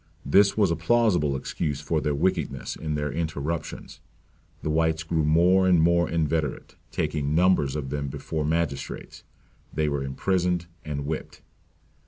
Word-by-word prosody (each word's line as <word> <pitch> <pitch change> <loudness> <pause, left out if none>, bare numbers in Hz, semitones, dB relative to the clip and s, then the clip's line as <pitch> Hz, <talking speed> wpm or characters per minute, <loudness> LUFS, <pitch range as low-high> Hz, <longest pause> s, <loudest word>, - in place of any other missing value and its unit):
This 100 +10 +4
was 100 -5 +3
a - - +2
plausible 85 -6 +2
excuse 75 +1 -3
for 75 +1 -1
their 75 -1 0
wickedness 85 0 -1
in 75 -1 -3
their 75 -1 -2
interruptions. 80 0 -4 0.6
The 75 - -1
whites 80 0 +1
grew 80 -1 0
more 90 +5 +4
and 90 -2 +5
more 85 +1 +3
inveterate; 80 -3 -1
taking 75 0 -1
numbers 85 -6 +3
of 70 -3 -4
them 70 -1 -2
before 75 +3 -3
magistrates 80 -2 -3 0.5
they 75 -1 0
were 70 -2 -1
imprisoned 90 +5 0 0.2
and 70 -2 -4
whipped. 80 +1 -5
80 Hz, 145 wpm, -26 LUFS, 75-85 Hz, 0.6 s, and